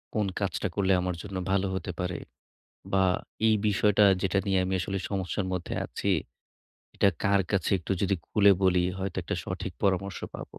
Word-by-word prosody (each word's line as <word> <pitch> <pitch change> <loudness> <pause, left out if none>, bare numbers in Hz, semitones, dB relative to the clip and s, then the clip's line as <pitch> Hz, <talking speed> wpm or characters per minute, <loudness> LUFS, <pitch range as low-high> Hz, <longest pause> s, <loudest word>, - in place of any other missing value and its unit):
কোন 105 - +2
কাজটা 95 -1 -1
করলে 95 -1 +2
আমার 90 -1 -2
জন্য 100 -2 -5
ভালো 100 0 +2
হতে 95 0 -3
পারে। 90 -1 -2 0.7
বা 95 -1 +4 0.4
এই 110 - +5
বিষয়টা 105 0 +4 0.2
যেটা 95 0 +1
নিয়ে 95 -1 +2
আমি 95 - -2
আসলে 95 +2 -2
সমস্যার 95 0 -2
মধ্যে 90 - -3
আছি, - - -2 0.8
এটা 100 - +4
কার 100 0 +4
কাছে 100 0 +1
একটু 85 - -5
যদি 100 0 +2
খুলে 100 -2 +5
বলি 90 -1 +4
হয়তো 95 0 -4
একটা 85 - -2
সঠিক 95 0 -5
পরামর্শ 95 -1 0 0.2
পাবো। - - -9
95 Hz, 170 wpm, -28 LUFS, 90-100 Hz, 0.8 s, এই